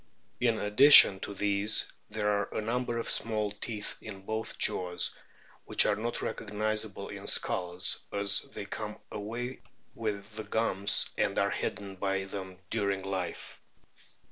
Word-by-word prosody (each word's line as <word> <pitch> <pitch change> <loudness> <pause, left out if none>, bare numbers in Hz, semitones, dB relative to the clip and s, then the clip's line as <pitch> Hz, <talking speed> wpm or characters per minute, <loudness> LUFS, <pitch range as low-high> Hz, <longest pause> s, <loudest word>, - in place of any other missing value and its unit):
In 115 -2 +2
addition 105 -1 +8
to 100 - -6
these 100 +2 +2 0.2
there 105 0 -2
are 100 0 0
a - - 0
number 120 +2 -2
of 115 - -3
small 110 -2 +2
teeth 105 0 -5
in 95 -2 -9
both 110 +1 -3
jaws, 90 -1 0 0.5
which - - +4
are 105 - +2
not 115 +3 -3
recognisable 110 0 -3
in - - -8
skulls, 90 0 +1
as 100 -1 +1
they 100 - -9
come 105 +1 -6
away 120 +5 -5 0.3
with 105 -2 -4
the 110 - -4
gums, 100 -3 +2
and - - +1
are - - +2
hidden 100 -2 -4
by 95 0 -1
them 95 -1 -7
during 100 -1 -1
life. 95 -2 -5
105 Hz, 145 wpm, -30 LUFS, 100-110 Hz, 0.5 s, addition